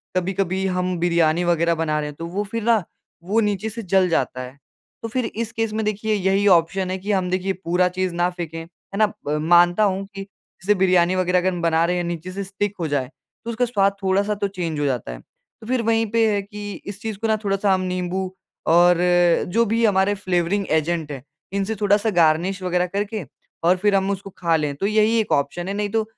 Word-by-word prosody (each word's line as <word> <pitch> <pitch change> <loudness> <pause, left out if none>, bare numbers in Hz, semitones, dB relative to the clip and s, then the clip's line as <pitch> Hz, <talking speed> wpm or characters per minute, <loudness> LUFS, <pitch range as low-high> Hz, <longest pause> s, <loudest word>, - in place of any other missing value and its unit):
कभी-कभी 190 +1 -1
हम 180 -1 -1
बिरयानी 170 -1 +2
वग़ैरह 170 -1 +2
बना 160 -1 -1
रहे 150 - -3
हैं, 145 - -10
तो 165 - -6
वो 195 +4 -2
फिर 230 -1 -3
ना 230 0 +4 0.5
वो 210 +5 +1
नीचे 210 0 -1
से 230 +2 -6
जल 190 0 +3
जाता 130 -5 -1
है। 125 +2 -9 0.5
तो - - -2
फिर 250 +1 -1
इस 225 0 -4
केस 225 -1 -2
में 220 0 -1
देखिए 215 +1 -1
यही 195 0 +1
ऑप्शन 185 +1 +3
है 190 - -2
कि 200 +3 -4
हम 185 -2 0
देखिए 185 +1 -1
पूरा 180 +2 +2
चीज़ 185 0 -2
ना 175 +1 +2
फेंके। 170 -3 -6
है 170 +4 -11
ना? 215 0 +4 0.2
म 150 +1 0
मानता 175 +4 +5
हूँ 195 -1 0
कि 195 - -5
जैसे 200 0 -3
बिरयानी 185 -1 +3
वग़ैरह 180 0 +2
अगर 185 +1 +1
हम 175 - -4
बना 165 -1 +2
रहे 180 +1 0
हैं 175 - -1
नीचे 170 +1 -5
से 200 +1 -4
स्टिक 200 +1 -3
हो 165 - -1
जाए, 140 -3 -1 0.4
तो - - -4
उसका 245 +2 +1
स्वाद 200 -4 +1
थोड़ा-सा 200 +2 +1
तो 200 0 -1
चेंज 175 -6 -4
हो 145 - 0
जाता 125 - -2
है। - - -8
तो 220 - -20
फिर 250 -1 +1
वहीं 225 0 +2
पे 225 -1 +3
है 200 - 0
कि 205 0 -7
इस 200 0 -8
चीज़ 220 -2 -4
को 225 - -1
ना 220 0 +2
थोड़ा-सा 195 -1 +2
नींबू 185 0 -2 0.4
और 175 +1 +5 0.5
जो 230 +5 +2
भी 230 +2 0
हमारे 195 -1 +3
फ्लेवरिंग 185 +1 0
एजेंट 160 -1 0
हैं, 135 -3 -7 0.3
इनसे 200 +2 -1
थोड़ा-सा 205 +2 +3
गार्निश 175 +2 +2
वग़ैरह 180 0 +1
करके 200 -1 -3 0.4
और 180 +2 +4
फिर 205 +1 +2
हम 195 0 +1
उसको 195 0 -5
खा 170 -2 +1
लें। 150 -2 -1
तो 195 - -3
यही 215 +2 +3
एक 220 - -2
ऑप्शन 145 +5 0
है, 195 - -2
नहीं 205 0 -2
तो 220 +1 +1
190 Hz, 225 wpm, -22 LUFS, 175-205 Hz, 0.5 s, मानता